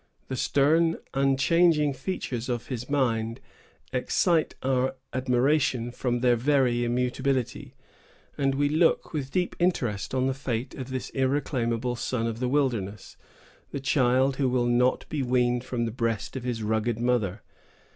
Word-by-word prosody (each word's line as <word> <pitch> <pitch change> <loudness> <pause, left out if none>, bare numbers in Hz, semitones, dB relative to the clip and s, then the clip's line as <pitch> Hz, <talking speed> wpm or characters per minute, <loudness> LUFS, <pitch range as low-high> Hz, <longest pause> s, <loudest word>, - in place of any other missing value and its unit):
The 130 - -2
stern, 160 +6 +2 0.2
unchanging 145 +3 +3
features 130 -4 -4
of 120 -2 -3
his 125 -1 -5
mind 115 -5 0 0.5
excite 160 +6 +1
our 130 0 +1 0.2
admiration 130 -1 +1
from 120 -1 -2
their 125 -1 +4
very 125 -1 +2
immutability; 125 +1 -1 0.6
and 135 -1 +1
we 145 +1 +2
look 160 +3 +2
with 140 -4 -3
deep 180 +3 -1
interest 130 - 0
on 130 0 +1
the 135 - +1
fate 125 -2 -3
of 130 -1 -7
this 130 -1 -4
irreclaimable 125 -3 0
son 120 -1 -2
of 115 -1 -3
the 125 0 0
wilderness, 115 -8 -1 0.5
the 140 - -4
child 130 0 +2
who 135 -2 +2
will 125 -1 +1
not 125 +1 +2
be 150 - -2
weaned 125 -1 +1
from 120 -2 -2
the 115 - -3
breast 115 -1 -2
of 130 - -3
his 120 -3 -2
rugged 110 +1 0
mother. 115 -5 0
130 Hz, 145 wpm, -27 LUFS, 120-135 Hz, 0.6 s, their